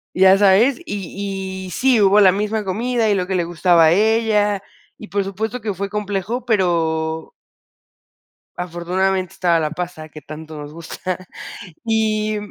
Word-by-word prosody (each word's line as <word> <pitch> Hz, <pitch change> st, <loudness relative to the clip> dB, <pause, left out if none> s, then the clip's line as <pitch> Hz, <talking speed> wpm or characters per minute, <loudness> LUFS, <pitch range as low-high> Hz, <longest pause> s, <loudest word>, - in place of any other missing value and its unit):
Ya 190 Hz, +1 st, +6 dB
sabes, 205 Hz, -, +4 dB
y 190 Hz, -, -5 dB
y -, -, -8 dB
sí, 250 Hz, +4 st, +2 dB
hubo 200 Hz, +1 st, +5 dB
la 190 Hz, -3 st, +7 dB
misma 210 Hz, +2 st, -2 dB
comida 225 Hz, +4 st, 0 dB
y 205 Hz, -, +3 dB
lo 185 Hz, -2 st, -2 dB
que 190 Hz, -, 0 dB
le 175 Hz, -, +1 dB
gustaba 170 Hz, 0 st, +3 dB
a 155 Hz, -, +5 dB
ella, 210 Hz, 0 st, +2 dB, 0.4 s
y 215 Hz, -, -9 dB
por 200 Hz, +2 st, -1 dB
supuesto 215 Hz, +5 st, -4 dB
que 215 Hz, -2 st, -2 dB
fue 195 Hz, +1 st, -4 dB
complejo, 210 Hz, +3 st, -3 dB
pero 160 Hz, -7 st, 0 dB, 1.2 s
afortunadamente 180 Hz, +2 st, -1 dB
estaba 170 Hz, -2 st, +2 dB
la 155 Hz, -1 st, -1 dB
pasta 170 Hz, -1 st, -6 dB
que 155 Hz, 0 st, -11 dB
tanto 155 Hz, +2 st, -9 dB
nos 145 Hz, 0 st, -8 dB
gusta 180 Hz, +3 st, -6 dB, 0.6 s
y 215 Hz, -1 st, 0 dB
190 Hz, 155 wpm, -20 LUFS, 175-210 Hz, 1.2 s, la